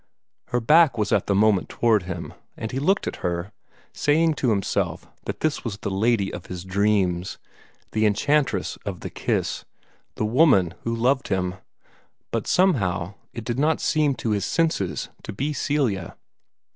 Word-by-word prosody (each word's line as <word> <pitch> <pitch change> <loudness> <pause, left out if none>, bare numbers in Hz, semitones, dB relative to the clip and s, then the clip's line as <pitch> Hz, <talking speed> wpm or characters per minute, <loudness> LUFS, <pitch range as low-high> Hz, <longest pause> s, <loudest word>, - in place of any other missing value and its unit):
Her 120 -1 0
back 150 +5 +5
was 105 -2 0
at - - +2
the 100 - +2
moment 105 -2 +3
toward 115 -3 +2
him; 90 -1 -6 0.2
and 110 - -4
he 130 - -2
looked 190 +8 +2
at - - -4
her, 85 +2 -3 0.4
saying 160 +2 +2
to 125 - +2
himself 100 -3 -1 0.2
that - - -5
this 155 -2 0
was 110 -5 -4
the 100 - -4
lady 100 0 +1
of - - -7
his 90 -1 -6
dreams, 95 -2 +1 0.5
the 110 0 +2
enchantress 145 +7 +1
of - - -5
the - - -6
kiss, - - -1 0.5
the 110 - -1
woman 110 - +4
who 115 0 0
loved 130 +4 +1
him 90 -1 0 0.8
but - - -2
somehow 100 - +2 0.2
it 115 - -7
did 120 +2 -3
not 155 +2 +2
seem 150 -3 +2
to 115 - -2
his 100 -1 0
senses 160 - 0
to - - -7
be 140 +9 -2
Celia. 130 - -1
110 Hz, 165 wpm, -24 LUFS, 95-140 Hz, 0.8 s, back